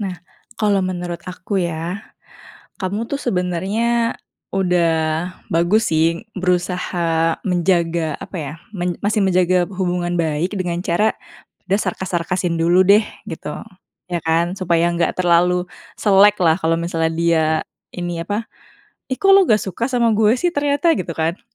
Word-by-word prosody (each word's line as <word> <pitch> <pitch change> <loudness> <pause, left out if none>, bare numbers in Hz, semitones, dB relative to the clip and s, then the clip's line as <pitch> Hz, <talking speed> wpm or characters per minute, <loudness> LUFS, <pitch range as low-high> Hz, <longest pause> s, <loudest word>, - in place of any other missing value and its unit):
Nah, 190 -3 -3 0.4
kalau 205 -3 +2
menurut 175 -2 -4
aku 185 +2 -3
ya, 170 +3 -3 0.8
kamu 205 +4 -2
tuh 280 - -2
sebenernya 215 +4 0 0.4
udah 180 -3 +2 0.6
bagus 185 +7 +2
sih 165 +5 +1
berusaha 175 -2 0
menjaga, 170 -4 +1
apa - - -8
ya, 145 -3 -5 0.2
men 175 -1 -2
masih 210 +1 +1
menjaga 185 -1 +3
hubungan 180 -2 -1
baik 160 +2 -1
dengan 175 -2 -2
cara 205 +4 +1 0.5
udah 195 - +2
sarkas-sarkasin 180 -2 -2
dulu 175 +3 +4
deh 205 +3 +5 0.2
gitu, 160 -3 -6 0.6
ya 175 -1 -1
kan? 165 +2 +1
Supaya 170 -2 +2
nggak 170 0 0
terlalu 180 0 +3 0.4
selek 205 0 +5
lah, 160 -2 +4
kalau 165 -1 +1
misalnya 165 -1 -1
dia 165 -1 +2 0.5
ini, 175 -1 -3
apa, 205 +5 -2 0.7
"Ih, 260 - -2
kok 390 - +5
lo 390 -1 +7
nggak 215 -8 +3
suka 195 +5 -3
sama 240 -2 +2
gue 215 0 +4
sih 355 - +3
ternyata?" 290 +2 +2
gitu 170 -2 -4
kan. 165 +4 -1
180 Hz, 140 wpm, -19 LUFS, 170-200 Hz, 0.8 s, lo